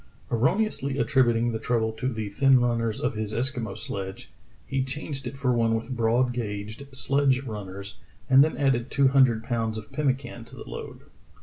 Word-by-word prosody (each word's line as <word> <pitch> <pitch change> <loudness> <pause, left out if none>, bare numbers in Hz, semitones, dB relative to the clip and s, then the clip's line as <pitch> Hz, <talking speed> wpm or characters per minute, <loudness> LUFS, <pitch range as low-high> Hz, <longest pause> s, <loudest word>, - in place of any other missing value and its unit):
" - - -29
Erro 120 - +2
neously 140 -11 -1
attributing 120 -4 +3
the 110 - -3
trouble 110 -1 0
to 125 +4 -3
the 110 -3 -4
thin 135 +5 +4
runners 115 -2 0
of - - -1
his 110 -1 -3
Eskimo 120 -4 -1
sledge, 95 -1 -6 0.3
he 135 -1 -1
changed 135 +1 -5
it 135 - -6
for 130 -2 +1
one 115 -1 +2
with 115 +3 -3
broad 120 +2 +2
gauged 110 +2 -5
sledge 135 0 +2
runners, 100 -4 -7 0.3
and 135 +1 +7
then 155 - -1
added 135 -3 +1
two 140 -1 +3
hundred 130 -5 +4
pounds 115 -2 -1
of 110 0 -9
pemmican 130 -5 -2
to - - -13
the - - -10
load. - - -8
120 Hz, 185 wpm, -26 LUFS, 110-135 Hz, 0.3 s, and